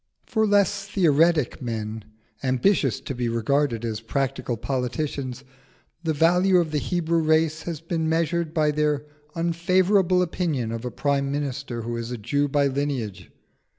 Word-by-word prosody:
For 220 Hz, -1 st, +1 dB
less 200 Hz, -1 st, +2 dB
theoretic 165 Hz, -7 st, +2 dB
men, 110 Hz, -2 st, -4 dB, 0.4 s
ambitious 135 Hz, -, +2 dB
to -, -, -5 dB
be 120 Hz, -2 st, -2 dB
regarded 120 Hz, +1 st, 0 dB
as 110 Hz, -1 st, -3 dB
practical 125 Hz, 0 st, -2 dB
politicians, 130 Hz, +1 st, -3 dB, 0.6 s
the 160 Hz, -, +1 dB
value 180 Hz, +5 st, +4 dB
of 170 Hz, -3 st, +1 dB
the 150 Hz, -, +1 dB
Hebrew 170 Hz, 0 st, 0 dB
race 155 Hz, 0 st, +2 dB
has 160 Hz, -3 st, -5 dB
been 165 Hz, -1 st, -1 dB
measured 165 Hz, 0 st, 0 dB
by 155 Hz, -2 st, +2 dB
their 150 Hz, -1 st, 0 dB, 0.3 s
unfavourable 180 Hz, +2 st, +2 dB
opinion 160 Hz, -10 st, -2 dB
of 115 Hz, +1 st, -5 dB
a -, -, -1 dB
prime 140 Hz, 0 st, 0 dB
minister 140 Hz, -4 st, -3 dB
who 120 Hz, +1 st, -3 dB
is 115 Hz, 0 st, -4 dB
a 125 Hz, -, -4 dB
Jew 145 Hz, +7 st, 0 dB
by 145 Hz, 0 st, +2 dB
lineage. 135 Hz, -7 st, -2 dB
145 Hz, 150 wpm, -24 LUFS, 125-170 Hz, 0.6 s, value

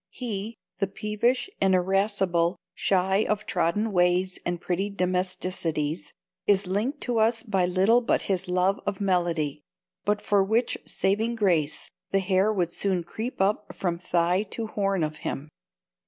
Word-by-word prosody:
He, 225 Hz, -3 st, -5 dB, 0.2 s
the 195 Hz, -, +1 dB
peevish 215 Hz, -, 0 dB
and 190 Hz, -1 st, +4 dB
irascible, 190 Hz, -2 st, +1 dB, 0.2 s
shy 190 Hz, 0 st, +2 dB
of 210 Hz, 0 st, 0 dB
trodden 210 Hz, +2 st, 0 dB
ways 180 Hz, 0 st, +2 dB
and 175 Hz, 0 st, -2 dB
pretty 185 Hz, +3 st, -1 dB
domesticities, 180 Hz, -5 st, -1 dB, 0.4 s
is 200 Hz, -1 st, +4 dB
linked 215 Hz, +10 st, -1 dB
to 240 Hz, -2 st, 0 dB
us 225 Hz, +1 st, +3 dB
by 195 Hz, -6 st, +1 dB
little 195 Hz, +7 st, +4 dB
but 240 Hz, -, +1 dB
his 190 Hz, -1 st, -1 dB
love 180 Hz, +2 st, +2 dB
of 200 Hz, -2 st, -1 dB
melody; 175 Hz, -6 st, 0 dB, 0.4 s
but 210 Hz, 0 st, +1 dB
for 205 Hz, -1 st, +2 dB
which 225 Hz, +5 st, +1 dB
saving 220 Hz, +5 st, 0 dB
grace, 175 Hz, -9 st, +1 dB, 0.2 s
the 195 Hz, -, +2 dB
hair 190 Hz, +2 st, +2 dB
would 180 Hz, -5 st, 0 dB
soon 185 Hz, -1 st, 0 dB
creep 220 Hz, +8 st, -5 dB
up 205 Hz, +2 st, 0 dB
from 175 Hz, -3 st, -2 dB
thigh 175 Hz, +1 st, +2 dB
to 230 Hz, -, -4 dB
horn 195 Hz, -4 st, 0 dB
of 155 Hz, 0 st, -3 dB
him. 145 Hz, +3 st, -5 dB
190 Hz, 150 wpm, -26 LUFS, 180-210 Hz, 0.4 s, and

